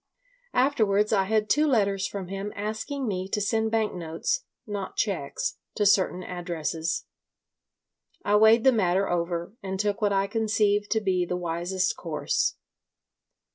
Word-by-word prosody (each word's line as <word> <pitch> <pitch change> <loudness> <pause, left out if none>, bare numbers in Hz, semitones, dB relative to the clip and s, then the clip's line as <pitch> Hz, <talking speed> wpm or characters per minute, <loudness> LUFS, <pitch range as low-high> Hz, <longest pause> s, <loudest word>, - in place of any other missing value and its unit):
Afterwards 215 -6 +3
I 195 -2 +3
had 215 +1 +1
two 300 +6 +3
letters 200 -7 +2
from 195 -3 -6
him 195 +1 -4
asking 220 +6 -3
me 190 -2 -2
to 210 - 0
send 220 +2 +1
bank 220 -1 0
notes—not 195 - -4
cheques—to - - -2
certain 185 -2 +3
addresses. 165 -2 -3 1.2
I 205 - +3
weighed 220 +2 +6
the 265 - +7
matter 195 -4 +2
over 170 +1 -2
and 190 -1 -4
took 205 +1 0
what 205 -1 +2
I 195 0 +2
conceived 210 -1 +1
to 220 - +1
be 185 -3 +1
the 180 0 -2
wisest 175 +2 -1
course. - - -1
200 Hz, 135 wpm, -26 LUFS, 185-220 Hz, 1.2 s, the